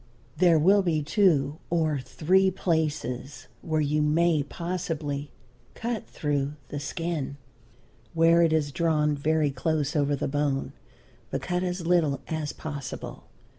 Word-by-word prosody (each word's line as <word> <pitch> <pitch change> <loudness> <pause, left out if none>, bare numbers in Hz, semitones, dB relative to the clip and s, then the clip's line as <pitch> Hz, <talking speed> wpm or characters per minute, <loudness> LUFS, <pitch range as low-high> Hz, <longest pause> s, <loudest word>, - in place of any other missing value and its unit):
There 175 -3 +5
will 195 +6 +5
be 160 -5 0
two 155 -4 +2
or 160 -4 +1
three 185 +9 +2
places 150 -8 -2 0.2
where 155 -1 0
you 150 +1 +1
may 155 +1 +3
possibly 155 -3 -4 0.5
cut 235 -2 -3
through 145 -1 -1 0.2
the 145 - -4
skin, 155 -1 -3 0.8
where 165 +1 +5
it 165 -1 +4
is 155 -2 +1
drawn 150 -2 +1
very 150 0 +1
close 150 0 -1
over 145 -1 +2
the - - -2
bone, 145 -1 -1 0.6
but - - -3
cut 180 0 -1
as 180 -1 -3
little 165 -5 +2
as 155 -2 -2
possible. 140 -5 -7
155 Hz, 130 wpm, -27 LUFS, 145-170 Hz, 0.8 s, There